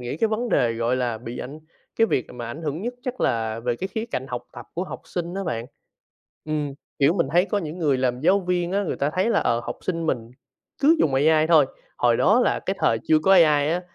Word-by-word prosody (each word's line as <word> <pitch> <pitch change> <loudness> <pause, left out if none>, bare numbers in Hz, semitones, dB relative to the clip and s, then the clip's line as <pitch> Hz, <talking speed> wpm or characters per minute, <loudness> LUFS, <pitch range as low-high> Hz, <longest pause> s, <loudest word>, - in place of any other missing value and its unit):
nghĩ 125 +4 -4
cái 225 +5 +1
vấn 230 +3 -2
đề 120 - +2
gọi 115 +2 0
là 120 -3 -1
bị 120 +1 -7
ảnh 145 +4 -7 0.4
cái 225 - +4
việc 125 - 0
mà 120 -1 -6
ảnh 145 +8 -7
hưởng 155 +4 -3
nhất 245 +2 -3
chắc 255 0 -5
là 115 -1 0
về 120 0 -1
cái 190 - -4
khía 220 +3 -3
cạnh 130 - -3
học 125 -2 -5
tập - - -10
của 180 +3 -2
học - - -8
sinh 175 0 -4
á 195 0 -3
bạn. 115 -6 -3 0.8
Ừm, 150 -2 -2 0.3
kiểu, 140 +5 +4
mình 170 -8 +1
thấy 175 +2 +4
có 205 - -1
những 165 -3 -5
người 145 -6 +1
làm 125 -1 0
giáo 195 +6 +4
viên 180 -1 -1
á, 200 +1 +1
người - - -2
ta 140 - 0
thấy 185 +5 +2
là, - - +3
ờ, 115 0 +1
học 120 - -5
sinh 165 -3 -2
mình 120 -5 -2 0.5
cứ 310 +4 +6
dùng 140 - +2
AI 155 +3 +4
thôi. 160 -4 +6 0.3
Hồi 120 -1 +3
đó 210 +7 +4
là - - +2
cái 190 - -3
thời 115 - +2
chưa 155 -1 +5
có 190 +5 +2
AI 155 -5 +5
á 175 +2 0
155 Hz, 255 wpm, -24 LUFS, 125-185 Hz, 0.8 s, cứ